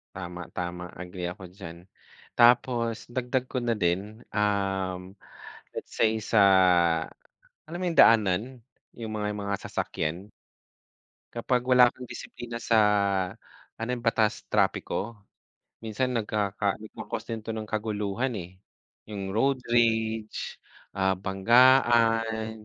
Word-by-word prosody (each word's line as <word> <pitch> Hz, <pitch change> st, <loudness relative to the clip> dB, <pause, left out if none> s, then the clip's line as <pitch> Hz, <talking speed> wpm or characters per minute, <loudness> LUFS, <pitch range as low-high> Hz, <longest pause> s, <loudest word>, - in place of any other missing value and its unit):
Tama 90 Hz, -1 st, -6 dB
tama 90 Hz, 0 st, -4 dB, 0.2 s
agree 90 Hz, 0 st, -6 dB
ako 95 Hz, +1 st, -11 dB
diyan. 85 Hz, -4 st, -9 dB, 0.6 s
Tapos 120 Hz, -1 st, +4 dB, 0.2 s
dagdag 125 Hz, 0 st, 0 dB
ko 130 Hz, -, -2 dB
na 120 Hz, -, 0 dB
din 85 Hz, +1 st, +2 dB, 0.4 s
um 95 Hz, -3 st, 0 dB, 0.7 s
let's -, -, -7 dB
say 110 Hz, -, +4 dB, 0.2 s
sa, 110 Hz, -, +5 dB, 1.3 s
alam 170 Hz, +3 st, -7 dB
mo -, -, -2 dB
yung 165 Hz, -, -5 dB
daanan? 105 Hz, -4 st, +5 dB, 0.6 s
Yung 110 Hz, -2 st, -6 dB
mga 105 Hz, 0 st, -2 dB
mga 100 Hz, 0 st, -1 dB
sasakyan? 85 Hz, +6 st, -3 dB, 1.0 s
Kapag 125 Hz, +1 st, 0 dB
wala 125 Hz, -1 st, +6 dB
kang 125 Hz, -, -10 dB
disiplina 120 Hz, -1 st, -8 dB
sa 115 Hz, 0 st, +2 dB, 1.0 s
ano 115 Hz, +2 st, -4 dB
yun 120 Hz, -, -9 dB
batas 110 Hz, -2 st, +1 dB
trapiko, 115 Hz, +3 st, 0 dB, 0.7 s
minsan 125 Hz, +3 st, -1 dB
nagkaka 105 Hz, -2 st, -1 dB
nagco-cause 110 Hz, -, -7 dB
din 110 Hz, -2 st, -5 dB
ito 115 Hz, -, -4 dB
ng 110 Hz, -1 st, -5 dB
kaguluhan 110 Hz, +3 st, -2 dB
eh 90 Hz, +2 st, -11 dB, 0.5 s
yung 100 Hz, -2 st, -6 dB
road 135 Hz, +4 st, +2 dB
rage 110 Hz, -2 st, 0 dB, 0.4 s
ah, 95 Hz, 0 st, +2 dB
banggaan, 115 Hz, +1 st, +3 dB
110 Hz, 115 wpm, -27 LUFS, 95-120 Hz, 1.3 s, wala